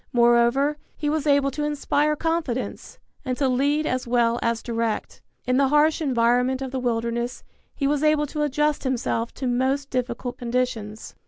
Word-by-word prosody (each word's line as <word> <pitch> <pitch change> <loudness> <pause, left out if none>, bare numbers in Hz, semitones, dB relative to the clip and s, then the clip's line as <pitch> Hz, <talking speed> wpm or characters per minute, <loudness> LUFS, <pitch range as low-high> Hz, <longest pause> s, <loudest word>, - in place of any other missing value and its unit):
Moreover, 240 +5 +3 0.2
he 295 -1 -1
was 310 -1 -1
able 280 -1 +3
to 295 +3 -3
inspire 295 0 +1
confidence, 320 -6 -3 0.3
and 255 -3 -2
to 280 - +1
lead 285 +4 +1
as 255 -3 -2
well 235 -1 +2
as 230 -1 -1
direct. 230 -2 -3 0.2
In 250 +1 +1
the 275 0 +4
harsh 300 +3 +3
environment 250 -1 +2
of 260 - -5
the 260 - -2
wilderness 235 0 -2 0.3
he 280 - -2
was 285 0 +1
able 305 -1 +3
to 300 +1 -4
adjust 295 +1 0
himself 245 -3 -1
to 265 - -5
most 265 +3 0
difficult 245 -1 -3
conditions. 235 -3 -3
260 Hz, 165 wpm, -24 LUFS, 240-295 Hz, 0.3 s, the